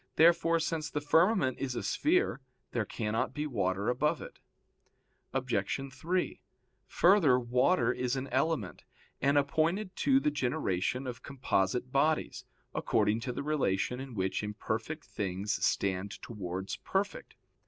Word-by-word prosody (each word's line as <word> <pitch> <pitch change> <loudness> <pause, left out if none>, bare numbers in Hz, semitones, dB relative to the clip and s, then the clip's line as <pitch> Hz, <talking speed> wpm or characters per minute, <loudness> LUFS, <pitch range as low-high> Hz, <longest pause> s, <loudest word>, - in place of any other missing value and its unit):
Therefore, 165 0 +5
since 160 -1 -2
the 150 - -2
firmament 160 - +3
is 130 -2 -2
a - - -3
sphere, 320 - +1 0.3
there 115 -3 -1
cannot 110 +4 -2
be 150 0 -2
water 100 -6 -1
above 125 +5 +1
it. - - -10 0.9
Obj. 135 -1 -2
3: 175 +7 -2 0.5
Further, 170 -9 +5
water 125 +9 +2
is 125 +1 -1
an 135 0 -2
element, 135 - -1 0.4
and 140 +2 +3
appointed 165 +8 +1
to 270 -1 +4
the 150 - +1
generation 125 - -1
of 125 -1 -6
composite 125 -3 -1
bodies, 150 +3 +1 0.3
according 105 0 +1
to 125 +2 -3
the 125 - -4
relation 125 -5 0
in 135 -3 -7
which 95 -1 -1
imperfect 110 +8 -4
things 95 +1 -3
stand 100 +1 0
towards 95 -4 -5
perfect. 200 +1 -3
130 Hz, 130 wpm, -31 LUFS, 110-155 Hz, 0.9 s, Therefore